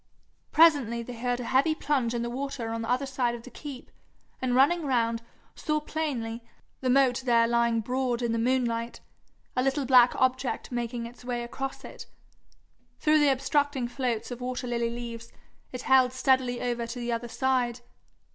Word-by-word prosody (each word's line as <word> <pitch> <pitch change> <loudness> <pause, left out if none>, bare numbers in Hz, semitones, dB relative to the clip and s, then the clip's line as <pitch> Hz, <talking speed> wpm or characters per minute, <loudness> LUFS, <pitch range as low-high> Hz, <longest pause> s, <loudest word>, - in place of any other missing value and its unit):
Presently 285 -8 +4
they 245 - -8
heard 245 +1 -2
a - - -4
heavy 270 +6 +2
plunge 260 -7 0
in 235 - -1
the 235 - -3
water 270 -2 -4
on 230 0 -3
the 225 - -5
other 255 +3 +1
side 255 -3 -1
of 235 - -10
the 255 - -12
keep, 275 0 -9 0.5
and 250 -1 0
running 290 +7 +4
round, 230 -4 +1 0.3
saw 305 -1 -1
plainly, 265 -7 -3 0.4
the 260 - -1
moat 260 -1 +3
there 235 -2 +4
lying 235 -1 +2
broad 250 +1 -1
in 235 - 0
the 230 - 0
moonlight, 235 -1 0 0.6
a 255 - +2
little 270 +1 0
black 250 -1 +6
object 260 0 0
making 240 -1 -3
its 240 +1 -11
way 245 -1 -3
across 270 +3 -5
it. - - -10 0.9
Through 305 0 +4
the 295 -2 +5
obstructing 275 -1 0
floats 245 -2 -2
of 245 0 -6
water 250 +1 -3
lily 235 -1 -1
leaves, 235 -1 -7 0.4
it 250 0 -6
held 260 -1 +4
steadily 260 -1 +2
over 240 -1 -2
to 245 - -6
the 240 0 -3
other 235 +1 -2
side. 245 -1 0
250 Hz, 175 wpm, -27 LUFS, 235-265 Hz, 0.9 s, black